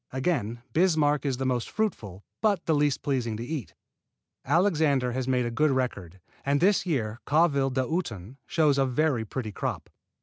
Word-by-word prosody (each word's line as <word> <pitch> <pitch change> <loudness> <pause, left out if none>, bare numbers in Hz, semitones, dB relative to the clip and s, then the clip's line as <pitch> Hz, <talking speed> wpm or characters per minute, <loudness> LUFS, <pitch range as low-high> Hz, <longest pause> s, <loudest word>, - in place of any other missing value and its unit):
Again 125 -5 -1
Bismarck 155 -5 +2
is 130 -2 -1
the 135 - -2
most 125 -2 -1
fruitful, 105 - -3 0.2
but 205 -5 +1
the 160 - +2
least 145 -2 +1
pleasing 120 -6 -1
to 115 - -5
eat. 145 -4 -5 0.7
Alexander 155 -8 +2
has 130 +1 -3
made 125 -2 +1
a 120 - -2
good 150 +6 +2
record, 100 -10 -2 0.2
and 140 +1 +1
this 190 +1 +3
year 120 -8 -1
Calville 145 -3 +3
d'Automne 130 - -3
shows 150 -4 +2
a 135 - +3
very 130 -3 +1
pretty 110 0 -4
crop. - - -4
135 Hz, 165 wpm, -27 LUFS, 120-155 Hz, 0.7 s, this